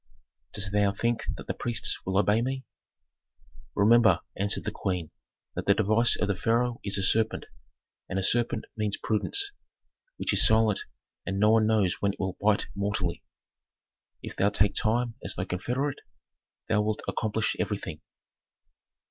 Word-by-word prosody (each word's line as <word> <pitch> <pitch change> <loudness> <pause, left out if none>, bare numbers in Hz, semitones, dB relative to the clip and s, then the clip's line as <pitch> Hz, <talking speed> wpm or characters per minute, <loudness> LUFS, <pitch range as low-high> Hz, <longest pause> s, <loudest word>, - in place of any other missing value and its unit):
'" - - -52
"Dost 100 -1 -2
thou 100 -1 +3
think 115 +3 -1
that - - -8
the - - -2
priests 120 -2 0
will 95 0 0
obey 105 +2 +3
me?" 130 +2 -3 1.1
"Remember," 110 -3 +5
answered 100 +1 0
the - - -2
queen, 90 -5 -3 0.4
"that - - -5
the 100 - +5
device 110 +3 +3
of 105 - +1
the 100 - 0
pharaoh 120 +4 0
is 100 -1 +1
a 95 - -1
serpent, 110 +3 +1 0.6
and 95 - -2
a 95 - 0
serpent 115 +1 0
means 105 -2 0
prudence, 400 - 0 0.7
which - - -1
is - - +5
silent, 110 -2 +4 0.4
and 95 0 -3
no 105 +1 +5
one 110 -1 +4
knows 105 -5 +2
when 100 -1 +1
it - - -16
will 95 -1 -2
bite 105 0 +2
mortally. 100 -4 -2 1.0
If - - -7
thou 100 - +3
take 105 0 +2
time 120 +2 0
as - - -2
thy 90 - -3
confederate, 125 +10 -2 0.7
thou 105 -1 +2
wilt 105 0 -2
accomplish 110 0 -1
everything." - - -3
105 Hz, 160 wpm, -28 LUFS, 100-115 Hz, 1.1 s, Remember